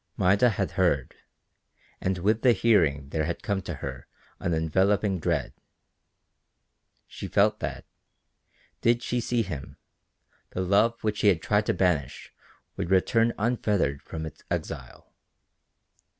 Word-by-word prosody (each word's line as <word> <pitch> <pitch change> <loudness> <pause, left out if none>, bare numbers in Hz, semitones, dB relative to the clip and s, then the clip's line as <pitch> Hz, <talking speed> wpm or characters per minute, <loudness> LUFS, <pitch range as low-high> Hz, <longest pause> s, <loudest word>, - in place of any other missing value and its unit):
Maida 100 +6 +4
had 100 -3 -2
heard, 85 -9 +1 0.9
and 95 0 0
with 105 +5 +1
the 125 -2 +5
hearing 75 -13 +2
there 80 +1 -1
had 85 +1 -4
come 100 -2 -1
to 90 - -5
her 65 -2 -7 0.3
an 85 - -2
enveloping 95 +5 +1
dread. - - -1 1.5
She - - -8
felt - - +2
that, - - -5 1.0
did 120 +1 +2
she 125 - -1
see 120 0 0
him, 90 -9 -7 0.8
the 95 - -2
love 105 +5 +2
which 105 -1 0
she - - +3
had 90 -5 +4
tried 105 0 +1
to - - +2
banish 85 -8 -1 0.4
would - - -3
return 115 +5 +3
unfettered 105 - 0
from 80 -1 -6
its 80 - -10
exile. - - -5
95 Hz, 135 wpm, -27 LUFS, 80-110 Hz, 1.5 s, the